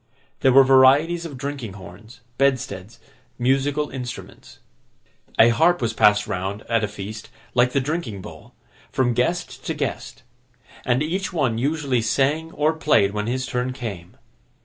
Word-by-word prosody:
There 130 - +4
were 135 +2 +8
varieties 140 +6 +4
of 140 -5 -10
drinking 135 -6 -5
horns, 100 +5 -13 0.2
bedsteads, 125 -7 -1 0.4
musical 135 +4 0
instruments. 125 -3 -8 0.8
A 115 - +7
harp 165 +9 +3
was 115 -3 -1
passed 105 -1 +4
round, 100 +1 -4
at 115 -1 0
a - - +1
feast, 105 +2 -8 0.2
like 125 0 +3
the 140 - +3
drinking 135 - -3
bowl, - - -12 0.4
from 125 -2 +1
guest 170 +10 -2
to - - -2
guest; - - -5 0.6
and 125 +4 +2
each 185 +5 -2
one 130 -10 0
usually 140 -2 0
sang 145 +8 0
or 150 +2 +1
played 150 -11 +2
when 105 +1 -3
his 130 +2 -2
turn 125 +2 -2
came. 100 -9 -7
130 Hz, 150 wpm, -22 LUFS, 110-145 Hz, 0.8 s, were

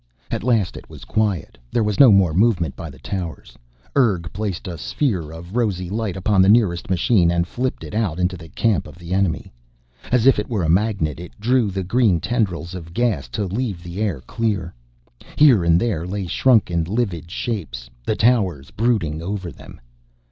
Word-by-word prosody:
At - - -1
last 115 -6 +1
it - - -12
was - - -11
quiet; 105 -11 -1
there 115 - +1
was 105 -2 -1
no 135 -5 +9
more 95 -5 +4
movement 90 - +2
by 85 - -7
the 65 - -13
towers. 85 +3 -6 0.4
Urg 100 - +2
placed 100 -3 -4
a 90 - -4
sphere 95 - -1
of 85 +5 -10
rosy 95 -7 -1
light 105 -3 -2
upon 95 +1 +3
the 95 - +5
nearest 100 -7 +3
machine 95 -1 +3
and 85 0 +1
flipped 125 +6 -3
it - - -8
out 105 -7 -1
into 90 +1 0
the 80 -3 -11
camp 110 +4 0
of - - -12
the 85 +1 -6
enemy. 95 -8 -1 0.6
As 125 -1 +3
if 135 -5 +6
it 105 - -4
were 105 -7 -1
a 80 - 0
magnet 90 -5 +1
it 90 +4 -11
drew 120 0 +2
the 95 0 -3
green 100 -2 +2
tendrils 95 -6 -1
of 85 -2 -9
gas, 115 - 0
to 100 - -3
leave 100 -2 -3
the 85 +4 -6
air 95 -11 -1
clear. 100 - -2 0.6
Here 135 - +6
and 85 0 +4
there 90 -7 -1
lay 100 +1 -3
shrunken, 90 -3 +3
livid 95 -5 -2
shapes, 85 - -4 0.2
the - - 0
towers 95 - +1
brooding 100 -10 0
over 95 -1 -4
them. - - -13
95 Hz, 190 wpm, -21 LUFS, 85-110 Hz, 0.6 s, no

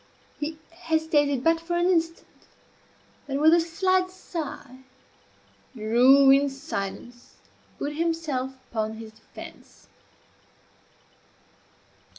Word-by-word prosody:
He 310 +1 -4
hesitated 315 -5 0
but 330 +1 +3
for 340 +1 -4
an 345 - +1
instant; 330 -2 0 1.0
then, 275 0 -2
with 315 +2 +6
a 340 - +6
slight 370 +2 +1
sigh, 320 -8 -7 1.0
drew 250 +5 +5
in 280 +1 +4
silence, 240 -1 -7 0.3
and - - -32
put 290 +1 -4
himself 315 -6 -2 0.2
upon 220 -1 -2
his 220 0 -10
defence. 220 - -14
295 Hz, 100 wpm, -25 LUFS, 255-330 Hz, 1.0 s, with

